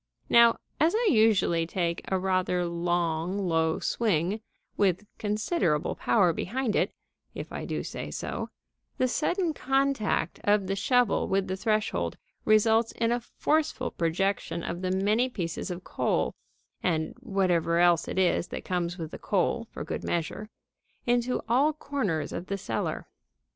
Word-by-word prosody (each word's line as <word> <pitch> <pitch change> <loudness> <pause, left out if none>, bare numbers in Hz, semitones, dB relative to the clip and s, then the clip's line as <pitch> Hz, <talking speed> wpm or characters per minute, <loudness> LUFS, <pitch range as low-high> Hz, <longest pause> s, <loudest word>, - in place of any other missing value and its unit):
Now, 235 0 +6 0.2
as 325 +6 +3
I 465 +1 +2
usually 210 -7 +3
take 170 -1 -1
a 190 - +3
rather 185 -1 +1
long, 170 +1 -1
low 165 -4 +1
swing, 205 -1 0 0.3
with 195 0 +1
considerable 210 - 0
power 185 -7 +3
behind 240 +6 -2
it - - +2 0.4
(if - - -6
I - - -5
do - - -3
say - - -6
so), - - -4 0.5
the 255 - +2
sudden 335 +6 0
contact 270 -6 0
of 205 -1 +3
the 195 +1 -1
shovel 245 +2 +2
with 195 0 +1
the 185 - -2
threshold 190 - -1 0.3
results 220 +1 +4
in 230 0 0
a 240 - +1
forceful 310 +6 -1
projection 170 0 -1
of 175 +1 -4
the 185 - -1
many 210 +7 +2
pieces 175 -5 -4
of 180 0 -5
coal - - 0 0.5
(and 160 -3 0
whatever 185 -7 +1
else 175 -1 +4
it - - -4
is 180 -1 +2
that - - -7
comes 175 -1 -1
with 165 -2 -6
the - - -8
coal 220 +4 0
for - - -6
good - - -5
measure) 175 +6 -2 0.6
into 245 +1 +1
all 270 +7 +3
corners 215 - -2
of 180 - -5
the 200 - -2
cellar. 195 - -3
195 Hz, 150 wpm, -28 LUFS, 175-235 Hz, 0.6 s, Now